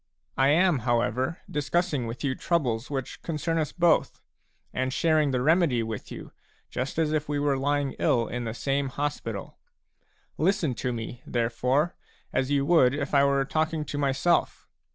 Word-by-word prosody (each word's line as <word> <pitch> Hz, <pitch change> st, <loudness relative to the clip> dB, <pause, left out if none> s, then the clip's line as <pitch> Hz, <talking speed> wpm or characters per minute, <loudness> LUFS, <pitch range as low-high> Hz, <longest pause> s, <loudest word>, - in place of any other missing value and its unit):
I 135 Hz, +1 st, +3 dB
am, 170 Hz, +1 st, +4 dB
however, 125 Hz, +5 st, 0 dB
discussing 150 Hz, -3 st, -1 dB
with 115 Hz, +1 st, -6 dB
you 135 Hz, -2 st, +1 dB
troubles 130 Hz, -7 st, -1 dB
which 135 Hz, -3 st, -4 dB
concern 165 Hz, 0 st, -1 dB
us 155 Hz, -, -1 dB
both, 175 Hz, -2 st, +2 dB, 0.5 s
and 130 Hz, 0 st, -1 dB
sharing 155 Hz, 0 st, +2 dB
the 125 Hz, -2 st, 0 dB
remedy 155 Hz, -6 st, +3 dB
with 110 Hz, -2 st, -6 dB
you, -, -, -8 dB, 0.4 s
just 130 Hz, +4 st, -3 dB
as 155 Hz, -2 st, +1 dB
if 155 Hz, -1 st, -1 dB
we 145 Hz, -, 0 dB
were 145 Hz, -1 st, +1 dB
lying 140 Hz, 0 st, 0 dB
ill 115 Hz, -2 st, +2 dB
in 120 Hz, 0 st, -4 dB
the 115 Hz, 0 st, -4 dB
same 135 Hz, +3 st, -1 dB
hospital. 125 Hz, -7 st, -4 dB, 0.8 s
Listen 170 Hz, -3 st, +2 dB
to 125 Hz, +2 st, -3 dB
me, 120 Hz, +1 st, -6 dB
therefore, 125 Hz, +7 st, +1 dB, 0.4 s
as 130 Hz, 0 st, 0 dB
you 140 Hz, -1 st, +2 dB
would 145 Hz, -5 st, +4 dB
if 145 Hz, 0 st, -3 dB
I 140 Hz, -1 st, +5 dB
were 140 Hz, -1 st, +2 dB
talking 155 Hz, +1 st, -1 dB
to 145 Hz, -, -4 dB
myself. 140 Hz, +5 st, +1 dB
140 Hz, 165 wpm, -27 LUFS, 125-155 Hz, 0.8 s, I